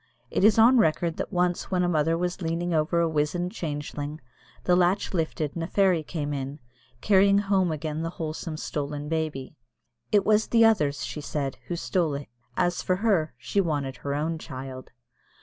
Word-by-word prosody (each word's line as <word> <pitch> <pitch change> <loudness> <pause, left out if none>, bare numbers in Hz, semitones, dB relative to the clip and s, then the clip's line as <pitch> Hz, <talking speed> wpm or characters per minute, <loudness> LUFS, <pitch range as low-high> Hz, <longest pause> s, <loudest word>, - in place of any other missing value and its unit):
It - - 0
is 215 +1 +6
on 240 +3 +7
record 165 -2 +1
that - - -4
once 180 -1 0
when 180 -1 +1
a - - +2
mother 165 -1 +2
was 180 +2 -2
leaning 170 +1 -1
over 160 +2 +2
a 170 - +3
wizened 160 +3 -1
changeling 150 -2 -5 0.4
the 180 - +3
latch 180 +3 +2
lifted 160 -3 -1
and 170 - -3
a - - -3
fairy 190 -4 +3
came 150 -2 -4
in, 140 +1 -4 0.4
carrying 200 0 +5
home 195 -3 +2
again 155 0 -3
the 165 - -2
wholesome 160 -1 -5
stolen 145 -1 -4
baby. 155 -5 -2 0.6
"It 205 -2 +4
was 215 0 +3
the 230 -1 +5
others," 150 -11 +2
she 150 - -5
said, 140 -2 -3
"who 175 - -2
stole 170 -3 0
it." 140 -3 -7 0.3
As 175 -1 +1
for 185 - +1
her, 185 - +1
she 200 +10 0
wanted 145 -7 -2
her 140 0 -3
own 160 +2 -1
child. 130 -3 -8
165 Hz, 185 wpm, -26 LUFS, 150-180 Hz, 0.6 s, on